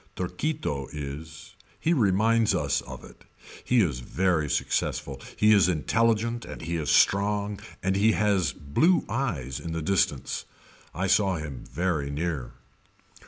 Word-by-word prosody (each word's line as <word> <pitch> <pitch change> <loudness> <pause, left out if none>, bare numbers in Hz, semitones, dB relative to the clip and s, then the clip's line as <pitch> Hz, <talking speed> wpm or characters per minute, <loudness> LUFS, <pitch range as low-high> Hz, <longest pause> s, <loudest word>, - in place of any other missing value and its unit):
Torquito 90 - -3
is. 75 +2 -8 0.3
He 165 - +2
reminds 110 - +3
us - - 0
of - - -9
it. - - -15 0.4
He 125 -2 +3
is 70 -8 -1
very 80 +2 0
successful. 70 -1 -1 0.2
He 105 0 +5
is 100 -3 +5
intelligent 115 +7 +1
and - - -9
he 85 +2 -3
is 75 -4 -3
strong 100 +1 +2 0.2
and 95 +1 +1
he 105 +3 +4
has 100 -8 +2
blue 155 - +2
eyes 80 - -2
in 80 - -5
the 80 - -2
distance. 75 -7 0 0.5
I 95 - -1
saw 95 0 +3
him 75 -6 -6
very 80 -1 -1
near. 75 -3 -3
90 Hz, 140 wpm, -26 LUFS, 75-105 Hz, 0.5 s, He